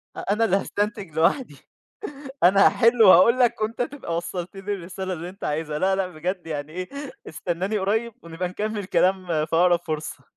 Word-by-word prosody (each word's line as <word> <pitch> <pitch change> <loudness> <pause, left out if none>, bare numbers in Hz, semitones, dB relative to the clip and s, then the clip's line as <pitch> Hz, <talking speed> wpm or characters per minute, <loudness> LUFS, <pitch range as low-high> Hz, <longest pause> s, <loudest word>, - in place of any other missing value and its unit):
أ - - -6
أنا 215 +3 +1
اللي 195 - +2
هاستنتج 205 -3 -3
لوحدي، 175 - +1 0.9
أنا 195 +3 +6
هاحل 230 -1 +4
وهاقول 200 +6 +7
لك 235 -3 +2
وأنت 225 +3 -2
تبقى 245 - -3
وصَّلت 175 +2 -5
لي 200 +1 -3
الرسالة 190 0 -5
اللي 170 0 -6
أنت 195 +2 -13
عايزها 150 0 -2
لا 190 +2 +2
لأ 190 -1 -1
بجد 180 +1 -5
يعني 150 -1 -5
إيه 185 0 -5 0.4
استناني 180 +6 -2
قريب 220 +4 -1
ونبقى 170 +2 -4
نكمّل 210 +1 -3
كلام 185 0 +1 0.2
في 165 - -2
أقرب 175 0 +4
فرصة. 155 0 -4
185 Hz, 175 wpm, -24 LUFS, 170-210 Hz, 0.9 s, وهاقول